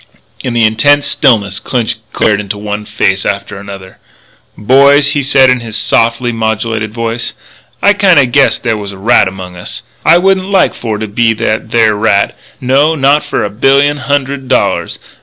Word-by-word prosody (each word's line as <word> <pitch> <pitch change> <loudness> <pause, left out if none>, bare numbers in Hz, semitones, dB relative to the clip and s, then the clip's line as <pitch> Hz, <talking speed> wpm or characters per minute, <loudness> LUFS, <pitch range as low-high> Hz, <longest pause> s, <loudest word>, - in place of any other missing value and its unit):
In 125 - -3
the 115 - +2
intense 145 +7 +3
stillness 105 -9 +1
Clinch 120 -4 -2
glared 105 -1 +1
into 105 0 -5
one 105 0 -5
face 95 -2 -1
after 100 -1 -4
another. 95 -2 -11 0.6
"Boys," 140 +5 +4
he 145 0 0
said 135 -1 +4
in 125 - +1
his 115 -2 -5
softly 115 +2 0
modulated 110 -1 -2
voice, 115 +1 -3 0.5
"I 205 - +5
kinda 185 -9 +4
guess 135 +3 +2
there's 105 -4 -3
a - - -11
rat 115 +4 +3
amongst 90 -1 -8
us. - - -8 0.2
I 165 - +5
wouldn't 190 +1 +1
like 195 -2 +2
for 110 -3 -4
to 110 +1 -5
be 115 +2 +1
that 110 0 -2
there 115 -2 +2
rat 105 -1 0 0.2
no, 140 +5 +1
not 140 +1 +2
for - - -3
a - - -2
billion 140 +6 +2
hundred 140 -1 -3
dollars. - - -1
115 Hz, 170 wpm, -11 LUFS, 105-140 Hz, 0.6 s, I